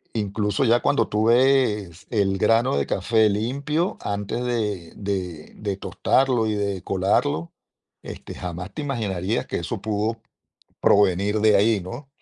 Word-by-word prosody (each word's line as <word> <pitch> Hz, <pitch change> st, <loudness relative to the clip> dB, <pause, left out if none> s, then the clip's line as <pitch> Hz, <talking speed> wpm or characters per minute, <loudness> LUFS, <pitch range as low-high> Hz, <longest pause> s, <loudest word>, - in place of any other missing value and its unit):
Incluso 105 Hz, +2 st, 0 dB
ya 120 Hz, +1 st, +4 dB
cuando 120 Hz, -5 st, +1 dB
tú 105 Hz, +1 st, 0 dB
ves 115 Hz, -8 st, +2 dB
el 100 Hz, -4 st, +1 dB
grano 115 Hz, -, +3 dB
de 70 Hz, -, 0 dB
café 110 Hz, -1 st, +2 dB
limpio, 140 Hz, -, -1 dB
antes 105 Hz, +4 st, -3 dB
de 105 Hz, -8 st, -2 dB
de 90 Hz, -6 st, -4 dB
de 100 Hz, -2 st, -4 dB
tostarlo 125 Hz, +3 st, +1 dB
y 110 Hz, -, 0 dB
de 100 Hz, -3 st, -2 dB
colarlo, 90 Hz, -4 st, 0 dB, 0.5 s
este, -, -, -9 dB
jamás 90 Hz, +2 st, -6 dB
te 155 Hz, -, -4 dB
imaginarías 110 Hz, -6 st, -2 dB
que -, -, -3 dB
eso 90 Hz, +5 st, -4 dB
pudo 110 Hz, +2 st, -1 dB, 0.6 s
provenir 100 Hz, +1 st, +3 dB
de 105 Hz, -1 st, +5 dB
ahí, 105 Hz, +1 st, +3 dB
¿no? 120 Hz, +10 st, -8 dB
105 Hz, 140 wpm, -23 LUFS, 95-115 Hz, 0.6 s, de